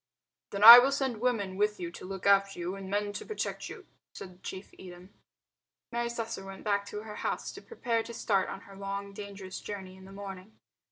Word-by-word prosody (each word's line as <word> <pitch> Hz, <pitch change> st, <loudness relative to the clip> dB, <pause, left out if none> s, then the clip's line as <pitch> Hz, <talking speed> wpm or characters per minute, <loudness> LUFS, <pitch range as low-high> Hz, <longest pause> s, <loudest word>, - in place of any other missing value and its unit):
"Then 200 Hz, 0 st, -3 dB
I 235 Hz, +2 st, +14 dB
will 265 Hz, +3 st, +3 dB
send 265 Hz, -5 st, -2 dB
women 205 Hz, -7 st, 0 dB
with 210 Hz, +1 st, +1 dB
you 170 Hz, -1 st, -5 dB
to 175 Hz, -, -10 dB
look 190 Hz, -1 st, -7 dB
after 200 Hz, 0 st, +4 dB
you, 175 Hz, +1 st, -3 dB
and 195 Hz, -1 st, -8 dB
men 205 Hz, +1 st, -1 dB
to 205 Hz, -, -5 dB
protect 435 Hz, -, -4 dB
you," -, -, -10 dB, 0.3 s
said 185 Hz, -1 st, -10 dB
Chief 190 Hz, +1 st, -8 dB
Edem. 180 Hz, +1 st, -12 dB, 0.8 s
Mary 235 Hz, 0 st, -1 dB
Slessor 230 Hz, -3 st, -5 dB
went 195 Hz, 0 st, -10 dB
back 200 Hz, -1 st, 0 dB
to 210 Hz, +1 st, -6 dB
her 215 Hz, -1 st, -8 dB
house -, -, -3 dB
to -, -, -11 dB
prepare 240 Hz, -, -2 dB
to 235 Hz, -, -8 dB
start 195 Hz, -5 st, +1 dB
on -, -, -7 dB
her 195 Hz, -, -14 dB
long 200 Hz, 0 st, -5 dB
dangerous 195 Hz, -2 st, -8 dB
journey 190 Hz, -2 st, -7 dB
in 190 Hz, 0 st, -14 dB
the 195 Hz, -, -13 dB
morning. 195 Hz, 0 st, -9 dB
200 Hz, 210 wpm, -30 LUFS, 190-220 Hz, 0.8 s, I